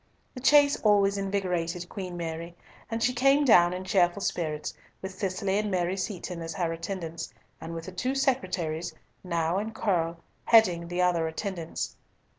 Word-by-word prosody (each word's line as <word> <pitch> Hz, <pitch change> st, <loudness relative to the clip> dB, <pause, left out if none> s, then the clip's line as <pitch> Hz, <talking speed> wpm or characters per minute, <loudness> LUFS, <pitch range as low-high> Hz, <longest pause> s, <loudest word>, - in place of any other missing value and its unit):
The -, -, -7 dB
chase 285 Hz, +2 st, +5 dB
always 200 Hz, -2 st, +4 dB
invigorated 180 Hz, -3 st, -2 dB
Queen 180 Hz, -2 st, -6 dB
Mary, 170 Hz, 0 st, -5 dB, 0.3 s
and 225 Hz, 0 st, -2 dB
she 250 Hz, -, +2 dB
came 275 Hz, +4 st, +4 dB
down 175 Hz, -8 st, +6 dB
in 180 Hz, +1 st, -4 dB
cheerful 185 Hz, 0 st, +2 dB
spirits, 155 Hz, -3 st, -2 dB, 0.3 s
with 190 Hz, 0 st, -6 dB
Cicely 190 Hz, +1 st, -1 dB
and 210 Hz, 0 st, -1 dB
Mary 180 Hz, -1 st, 0 dB
Seaton 185 Hz, -3 st, -4 dB
as 165 Hz, 0 st, -5 dB
her 170 Hz, -3 st, -1 dB
attendants, 165 Hz, -1 st, -5 dB, 0.3 s
and 165 Hz, +1 st, -6 dB
with 165 Hz, 0 st, -6 dB
the 185 Hz, -, -7 dB
two 255 Hz, +8 st, -2 dB
secretaries, 180 Hz, -, -1 dB, 0.3 s
Nau 170 Hz, -1 st, 0 dB
and 220 Hz, +2 st, -3 dB
Curll, 170 Hz, -6 st, 0 dB, 0.3 s
heading 180 Hz, -7 st, +5 dB
the 175 Hz, +1 st, 0 dB
other 170 Hz, -2 st, +2 dB
attendants. 170 Hz, 0 st, -4 dB
180 Hz, 160 wpm, -28 LUFS, 170-205 Hz, 0.3 s, down